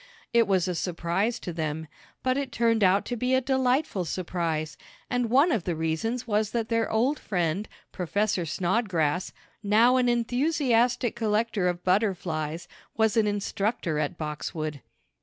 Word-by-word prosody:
It 235 Hz, -1 st, +4 dB
was 190 Hz, -2 st, +2 dB
a 180 Hz, -, -1 dB
surprise 180 Hz, +6 st, -1 dB
to 175 Hz, -, -5 dB
them, 160 Hz, -1 st, -3 dB, 0.4 s
but 255 Hz, 0 st, +2 dB
it 275 Hz, -2 st, -2 dB
turned 230 Hz, -2 st, +2 dB
out 190 Hz, +1 st, +4 dB
to 245 Hz, -, -3 dB
be 250 Hz, +2 st, +1 dB
a -, -, +4 dB
delightful 260 Hz, -, +1 dB
surprise, 165 Hz, -3 st, -2 dB, 0.4 s
and 245 Hz, -2 st, 0 dB
one 280 Hz, +8 st, +4 dB
of 215 Hz, -, 0 dB
the 175 Hz, -2 st, -2 dB
reasons 165 Hz, +10 st, -2 dB
was 215 Hz, -2 st, +1 dB
that 230 Hz, -1 st, -1 dB
their 230 Hz, -1 st, +1 dB
old 250 Hz, +7 st, +1 dB
friend, 180 Hz, +1 st, -1 dB, 0.2 s
Professor 200 Hz, +1 st, 0 dB
Snodgrass, 180 Hz, -1 st, 0 dB, 0.3 s
now 225 Hz, +5 st, +4 dB
an 250 Hz, -1 st, +3 dB
enthusiastic 245 Hz, -1 st, +1 dB
collector 220 Hz, -3 st, 0 dB
of 175 Hz, 0 st, -2 dB
butterflies, 175 Hz, -5 st, 0 dB, 0.3 s
was 220 Hz, -2 st, +3 dB
an 220 Hz, -2 st, +3 dB
instructor 205 Hz, -5 st, -1 dB
at 150 Hz, +3 st, -2 dB
Boxwood. 155 Hz, -1 st, -4 dB
205 Hz, 150 wpm, -27 LUFS, 170-235 Hz, 0.4 s, It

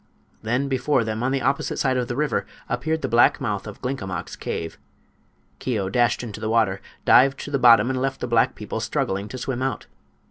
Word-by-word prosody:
Then 125 Hz, +5 st, 0 dB
before 135 Hz, -1 st, +1 dB
them, 110 Hz, 0 st, -3 dB
on 130 Hz, +2 st, 0 dB
the 135 Hz, -1 st, -1 dB
opposite 135 Hz, +2 st, 0 dB
side 130 Hz, -1 st, +1 dB
of 125 Hz, -1 st, -1 dB
the 120 Hz, -, -3 dB
river, 150 Hz, +2 st, -1 dB, 0.2 s
appeared 160 Hz, 0 st, -2 dB
the -, -, +1 dB
black 120 Hz, +1 st, +4 dB
mouth 105 Hz, -6 st, -3 dB
of 105 Hz, -, -10 dB
Glinkomok's 125 Hz, -8 st, -4 dB
cave. 80 Hz, 0 st, -5 dB, 0.8 s
Keo 105 Hz, -7 st, -2 dB
dashed 120 Hz, +4 st, +1 dB
into 110 Hz, -3 st, -7 dB
the 110 Hz, 0 st, -3 dB
water, 110 Hz, -4 st, +2 dB, 0.2 s
dived 135 Hz, +2 st, +5 dB
to 145 Hz, -, -7 dB
the 140 Hz, -, +1 dB
bottom 115 Hz, -2 st, +7 dB
and 130 Hz, -1 st, -2 dB
left 135 Hz, 0 st, -1 dB
the -, -, -3 dB
black 115 Hz, -1 st, +2 dB
people 105 Hz, +1 st, -5 dB
struggling 110 Hz, -4 st, -2 dB
to 130 Hz, -, -7 dB
swim 130 Hz, 0 st, -3 dB
out. 135 Hz, 0 st, -2 dB
120 Hz, 205 wpm, -23 LUFS, 110-135 Hz, 0.8 s, bottom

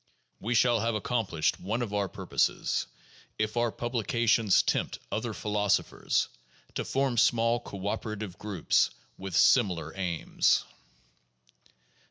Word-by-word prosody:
We 120 Hz, +4 st, -1 dB
shall 120 Hz, 0 st, +4 dB
have 115 Hz, +1 st, 0 dB
accomplished 105 Hz, -7 st, 0 dB
one 110 Hz, +6 st, -2 dB
of 105 Hz, -3 st, -5 dB
our 100 Hz, -2 st, 0 dB
purposes -, -, 0 dB, 0.5 s
if 110 Hz, +1 st, -1 dB
our 120 Hz, -1 st, +1 dB
publications 115 Hz, -3 st, +2 dB
tempt -, -, -1 dB
other -, -, -2 dB
philosophers 105 Hz, -1 st, 0 dB, 0.5 s
to -, -, -2 dB
form 135 Hz, -3 st, 0 dB
small 115 Hz, +1 st, +3 dB
cooperative 105 Hz, -1 st, -5 dB
groups 100 Hz, -6 st, +1 dB, 0.3 s
with 95 Hz, -2 st, -5 dB
similar 90 Hz, -, +3 dB
aims. 90 Hz, -4 st, +1 dB
110 Hz, 110 wpm, -29 LUFS, 100-120 Hz, 0.5 s, shall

